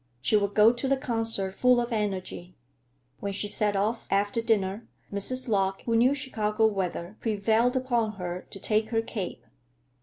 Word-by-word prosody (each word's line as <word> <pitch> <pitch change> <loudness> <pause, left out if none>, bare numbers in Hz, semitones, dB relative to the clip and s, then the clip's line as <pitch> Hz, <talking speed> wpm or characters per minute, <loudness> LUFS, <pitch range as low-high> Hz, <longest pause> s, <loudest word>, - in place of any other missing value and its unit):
She 135 - +1
would 200 -1 +1
go 215 +2 +6
to 245 +3 -2
the 275 0 +2
concert 225 -6 0
full 250 +3 +4
of 240 +1 -2
energy. 185 -4 -3 0.6
When 200 -1 -3
she 205 +1 -1
set 205 0 +2
off, 215 +4 -1
after 205 +3 +1
dinner, 210 -2 0 0.3
Mrs. 255 +7 -2
Lorch, 195 -3 0
who 230 - 0
knew 250 +5 +4
Chicago 220 -5 0
weather, 195 -2 -2
prevailed 225 +3 +1
upon 240 -4 0
her 180 -2 -6
to 195 - -8
take 215 +2 +1
her 225 -1 0
cape. 190 - -5
215 Hz, 170 wpm, -27 LUFS, 195-230 Hz, 0.6 s, go